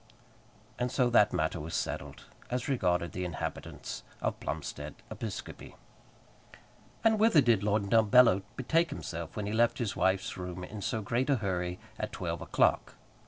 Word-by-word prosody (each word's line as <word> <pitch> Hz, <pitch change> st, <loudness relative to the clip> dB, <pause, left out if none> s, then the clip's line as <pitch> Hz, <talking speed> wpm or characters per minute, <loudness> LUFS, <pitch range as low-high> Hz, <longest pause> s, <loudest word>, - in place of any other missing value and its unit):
And 125 Hz, 0 st, 0 dB
so 125 Hz, -2 st, +2 dB
that 105 Hz, -3 st, +5 dB
matter 80 Hz, +2 st, 0 dB
was 80 Hz, +2 st, -5 dB
settled, -, -, -4 dB, 0.2 s
as 125 Hz, 0 st, -2 dB
regarded 90 Hz, -, +1 dB
the 90 Hz, -, -4 dB
inhabitants 85 Hz, -2 st, -5 dB, 0.2 s
of -, -, -2 dB
Plumstead 75 Hz, 0 st, -5 dB, 0.2 s
Episcopi. 110 Hz, -4 st, -6 dB, 1.3 s
And 220 Hz, -1 st, +4 dB
whither 220 Hz, -7 st, +6 dB
did 120 Hz, -7 st, +4 dB
Lord 105 Hz, 0 st, +1 dB
Dumbello 110 Hz, -2 st, +6 dB
betake 165 Hz, +6 st, +2 dB
himself 85 Hz, -1 st, -6 dB
when 105 Hz, -, -3 dB
he 105 Hz, -, -3 dB
left 120 Hz, +1 st, +3 dB
his 115 Hz, -6 st, -2 dB
wife's 95 Hz, 0 st, +1 dB
room 90 Hz, 0 st, -5 dB
in 105 Hz, +3 st, -7 dB
so 110 Hz, +2 st, -2 dB
great 120 Hz, +6 st, 0 dB
a 140 Hz, -, +5 dB
hurry 90 Hz, -5 st, -2 dB, 0.2 s
at -, -, -3 dB
twelve -, -, -3 dB
o'clock? -, -, +1 dB
105 Hz, 155 wpm, -31 LUFS, 90-125 Hz, 1.3 s, whither